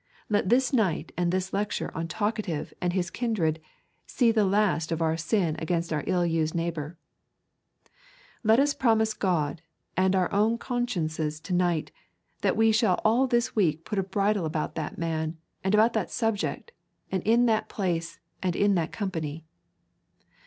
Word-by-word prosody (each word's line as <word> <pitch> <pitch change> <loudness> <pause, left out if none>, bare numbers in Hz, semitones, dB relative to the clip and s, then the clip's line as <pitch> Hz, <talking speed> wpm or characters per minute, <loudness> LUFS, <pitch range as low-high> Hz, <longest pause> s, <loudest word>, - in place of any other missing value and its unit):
Let 205 -3 +1
this 255 +3 +3
night 205 -10 +1
and 175 0 +1
this 185 +1 -2
lecture 205 +1 -2
on 165 +1 -2
Talkative 205 -3 -2
and 180 - +1
his 180 -1 -1
kindred 175 -10 -1 0.5
see 240 -3 +3
the 215 -2 +3
last 190 -5 +1
of 165 - 0
our 160 -1 +1
sin 165 0 0
against 170 0 -1
our 150 - -1
ill 180 -1 +2
used 165 -1 0
neighbour. 165 -1 -3 1.5
Let 220 +2 +5
us 285 +1 +3
promise 220 -5 +2
God 170 -7 -1 0.3
and 190 +1 +3
our 185 -2 +1
own 215 +3 +3
consciences 165 - -2
to 180 - -4
night, 175 -3 +1 0.5
that - - +1
we 225 0 +5
shall 215 -4 +3
all 240 +5 +4
this 240 0 +1
week 165 -6 +1
put 210 - -2
on - - +1
a - - -13
bridle 200 -1 +1
about 155 0 -2
that 155 -2 -5
man, 160 -1 -2 0.3
and 190 +2 +2
about 225 +2 +4
that 210 -6 -1
subject, 225 - -2 0.4
and 190 -2 0
in 230 +5 +4
that 220 -2 +1
place, 170 -4 -2 0.2
and 180 -2 0
in 205 0 +3
that 170 -3 0
company. 165 -6 -4
185 Hz, 165 wpm, -27 LUFS, 165-220 Hz, 1.5 s, Let